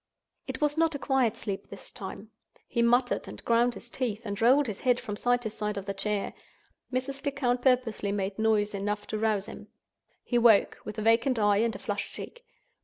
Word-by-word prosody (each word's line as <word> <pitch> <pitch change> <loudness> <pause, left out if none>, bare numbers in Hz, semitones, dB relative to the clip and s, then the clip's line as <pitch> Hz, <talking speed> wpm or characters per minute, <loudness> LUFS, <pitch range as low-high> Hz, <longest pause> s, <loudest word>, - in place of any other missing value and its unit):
It - - -5
was 295 +1 +1
not 325 -2 +2
a - - 0
quiet 265 -5 +1
sleep 200 -3 -5
this 200 - -11
time. 200 +2 -8 0.4
He 235 - 0
muttered, 245 +2 +2
and - - -9
ground 235 +1 +3
his 195 - -9
teeth, 235 -3 -3
and 205 0 -4
rolled 265 +5 +5
his 215 -5 -4
head 250 -1 +3
from 205 - -5
side 245 +3 +1
to 220 - -3
side 210 -1 -3
of 195 - -4
the 200 - -3
chair. 200 +1 -2 0.6
Mrs. 260 +2 -3
Lecount 265 -4 0
purposely 245 -6 +1
made 200 0 -2
noise 215 -2 +2
enough 205 +1 -2
to 215 - -3
rouse 215 -3 +1
him. - - -10 0.6
He 240 - +1
woke, 230 -4 +5
with 210 - -6
a 215 - -2
vacant 230 +3 +3
eye 205 -2 +3
and 225 0 +1
a - - -4
flushed 205 -4 -4
cheek. 485 - -9
225 Hz, 205 wpm, -28 LUFS, 205-250 Hz, 0.6 s, rolled